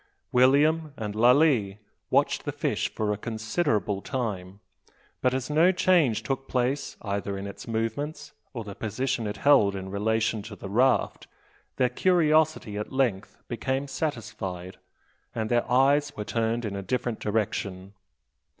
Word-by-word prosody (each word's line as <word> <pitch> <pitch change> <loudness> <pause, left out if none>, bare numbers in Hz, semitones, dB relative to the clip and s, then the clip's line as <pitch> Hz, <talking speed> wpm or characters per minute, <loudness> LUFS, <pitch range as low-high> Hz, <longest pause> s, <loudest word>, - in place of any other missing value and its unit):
William 145 +4 +3
and 105 -2 -4
Lalee 120 -3 +4 0.3
watched - - +2
the - - -3
fish - - -1
for 105 -1 0
a - - -4
considerable 110 - -1
time; 100 -8 -4 0.6
but 125 - +3
as 130 0 -2
no 160 +5 +4
change 165 - +3
took 135 +3 -3
place 130 +3 -1
either 100 -1 -3
in 100 - -5
its 100 - -8
movements 145 +7 -3 0.2
or 120 -5 -5
the 100 -1 -8
position 120 +3 -2
it 105 - -4
held 130 -9 +4
in 95 0 -6
relation 110 +2 0
to 105 0 -9
the 95 -1 -8
raft, 125 +3 +2 0.5
their 125 - +3
curiosity 155 - +2
at 105 - -5
length 120 -8 -1
became 130 +3 -2
satisfied, 110 - -4 0.6
and 110 0 -2
their 120 0 +1
eyes 140 +3 +3
were 105 - -4
turned 115 +1 -1
in 100 -2 -3
a 100 - -3
different 120 +3 -2
direction. 100 -3 -2
115 Hz, 145 wpm, -27 LUFS, 105-135 Hz, 0.6 s, Lalee